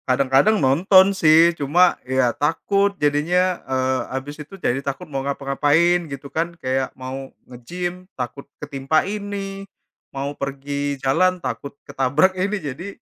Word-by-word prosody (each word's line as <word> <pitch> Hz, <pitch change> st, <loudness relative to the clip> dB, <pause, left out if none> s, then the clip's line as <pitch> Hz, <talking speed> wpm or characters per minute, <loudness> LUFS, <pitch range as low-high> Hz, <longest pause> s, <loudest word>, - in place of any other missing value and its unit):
Kadang-kadang 135 Hz, +11 st, +3 dB
nonton, 185 Hz, +8 st, +5 dB
sih, 165 Hz, -1 st, +5 dB
cuma, 170 Hz, +4 st, +3 dB
ya, 130 Hz, -1 st, +1 dB
takut. 195 Hz, +7 st, +1 dB
Jadinya, 175 Hz, +5 st, +1 dB
eee, 130 Hz, 0 st, 0 dB, 0.2 s
abis 145 Hz, +3 st, -7 dB
itu 155 Hz, +6 st, -11 dB
jadi 135 Hz, -7 st, -1 dB
takut 140 Hz, +6 st, -5 dB
mau 135 Hz, -4 st, -4 dB
ngapa-ngapain 145 Hz, +5 st, +1 dB
gitu, 140 Hz, 0 st, -8 dB
kan, 170 Hz, +1 st, -2 dB
Kayak 130 Hz, -3 st, -1 dB
mau 130 Hz, +1 st, -6 dB, 0.2 s
nge-gym 175 Hz, +9 st, -6 dB
takut 135 Hz, +2 st, -6 dB
ketimpa 140 Hz, +1 st, -1 dB
ini, 200 Hz, -1 st, -5 dB, 0.4 s
mau 140 Hz, +1 st, -4 dB
pergi 140 Hz, +1 st, -4 dB
jalan 170 Hz, +8 st, +2 dB
takut 140 Hz, -5 st, -6 dB
ketabrak 140 Hz, +8 st, +2 dB
ini. 195 Hz, +3 st, -1 dB
Jadi, 155 Hz, +1 st, -6 dB
145 Hz, 135 wpm, -21 LUFS, 135-180 Hz, 0.4 s, nonton